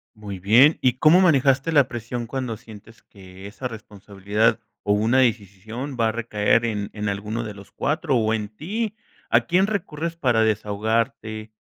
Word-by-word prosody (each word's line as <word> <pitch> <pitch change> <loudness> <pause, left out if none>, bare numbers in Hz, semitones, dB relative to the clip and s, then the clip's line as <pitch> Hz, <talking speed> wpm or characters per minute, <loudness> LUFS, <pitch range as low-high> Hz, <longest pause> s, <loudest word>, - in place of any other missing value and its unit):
Muy 105 -3 -7
bien, 120 - +5
¿y 125 -2 +2
cómo 160 +4 +6
manejaste 140 -4 +3
la 145 -4 +4
presión 120 0 -5
cuando 125 -3 -4
sientes 115 0 -15
que 95 -1 -14
esa 125 +5 -6
responsabilidad, 105 0 -2 0.2
o 105 - +1
una 110 +5 +2
decisisión 115 +3 -2
va 115 - +3
a 110 - -1
recaer 115 0 +1
en 105 -3 -2
en 105 0 -4
alguno 105 +4 -3
de 105 -2 -7
los 100 0 -14
4, 150 -2 -1
o 110 -1 +1
en 105 -2 -3
ti? 210 - -4 0.3
¿A 120 - +4
quién 180 +10 +2
recurres 170 -5 -3
para 120 -8 +2
desahogarte, 110 +1 -1
115 Hz, 165 wpm, -23 LUFS, 105-130 Hz, 0.3 s, cómo